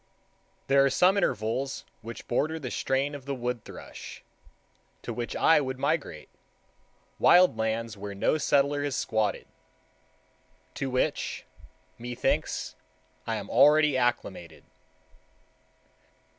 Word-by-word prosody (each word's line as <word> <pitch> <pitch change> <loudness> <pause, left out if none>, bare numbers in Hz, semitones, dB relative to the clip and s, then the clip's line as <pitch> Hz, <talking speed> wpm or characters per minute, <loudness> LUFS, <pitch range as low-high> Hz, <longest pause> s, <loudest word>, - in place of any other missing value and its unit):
There 135 0 +4
are 140 - +4
some 180 +8 +4
intervals 135 - -1 0.2
which 115 +1 -9
border 155 +6 0
the 130 -6 -6
strain 135 +2 -1
of 140 -3 -8
the 140 0 -3
wood 125 -2 -3
thrush, - - -10 0.8
to - - -4
which 120 -1 -4
I 160 -2 +4
would 130 -1 -4
migrate—wild 140 - 0
lands 110 0 -2
where 100 0 -7
no 155 +10 +1
settler 145 0 +2
has 145 -2 -2
squatted; 110 -6 -1 1.3
to 135 - -3
which, 130 0 -1 0.5
methinks, 120 +1 -2 0.5
I - - -1
am - - -5
already 150 -1 +5
acclimated. 120 -8 -2
130 Hz, 110 wpm, -27 LUFS, 115-145 Hz, 1.3 s, already